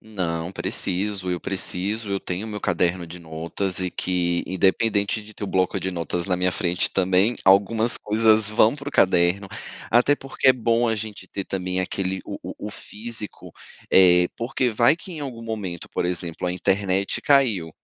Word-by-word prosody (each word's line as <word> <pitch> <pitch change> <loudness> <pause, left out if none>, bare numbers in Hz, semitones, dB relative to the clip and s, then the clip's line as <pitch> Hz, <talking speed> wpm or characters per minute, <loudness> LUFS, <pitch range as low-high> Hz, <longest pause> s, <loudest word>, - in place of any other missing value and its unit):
Não. 85 -6 -3
Preciso, 95 0 -2
eu 90 -1 -2
preciso. 100 +3 -2
Eu 100 0 -1
tenho 95 +4 -4
o - - -7
meu 105 0 -5
caderno 85 -1 0
de 85 +2 -9
notas 85 +4 -3
e 90 -1 -1
que, 85 -1 0
independente 100 +3 +1
de 105 +1 -14
ter 105 - -6
o - - -4
bloco 95 -2 0
de 95 - -2
notas 85 0 -3
na 90 -2 +1
minha 90 0 +1
frente 85 0 0
também, 95 +4 +2
algumas 110 +4 +4
coisas 110 0 +3
vão 110 +2 +4
para 145 0 -6
o - - -9
caderno, 90 +1 +3 0.4
até 125 +5 +5
porque 135 -1 0
é - - +9
bom 115 -1 +1
a 110 - +1
gente 105 -3 -6
ter 100 - -5
também 95 -1 -2
aquele 95 0 -2
o - - -6
o - - -6
o - - -5
físico, 110 -1 -7 0.4
eh, 90 -1 +6
porque 125 +1 -1
vai 120 +5 +4
que 185 +1 -9
em 160 - -7
algum 125 -5 -6
momento, 105 -7 -5
por - - -2
exemplo, 90 -1 -3
a 90 - -1
internet 95 +1 0
caiu, 115 - +3
95 Hz, 185 wpm, -23 LUFS, 90-110 Hz, 0.4 s, é